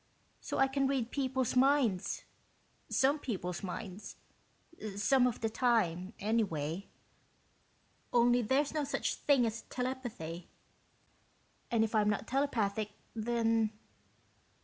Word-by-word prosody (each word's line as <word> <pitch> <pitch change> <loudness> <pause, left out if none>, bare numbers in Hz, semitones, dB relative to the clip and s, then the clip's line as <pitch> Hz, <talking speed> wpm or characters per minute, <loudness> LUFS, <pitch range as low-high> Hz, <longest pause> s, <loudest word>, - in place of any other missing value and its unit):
So - - -4
I 270 - +5
can 270 0 +1
read 260 -4 -1
people's 260 -3 0
minds 255 -7 +2 0.7
some 280 +3 +3
people's 180 -9 -3
minds, 195 +1 -6 0.8
some 250 +5 +4
of 240 - -3
the 225 - +1
time, 215 -6 +1
anyway... 195 -5 -1 1.2
only 240 +1 +4
there's 270 +6 +1
no 305 -1 0
such 285 - -1
thing 275 -4 +3
as 225 0 -2
telepathy. 245 -10 -4 1.2
And 230 -2 +3
if 220 - -2
I'm 210 -1 +3
not 210 +1 -1
telepathic, 220 -6 0 0.2
then...." 225 -1 +1
230 Hz, 110 wpm, -33 LUFS, 205-265 Hz, 1.2 s, I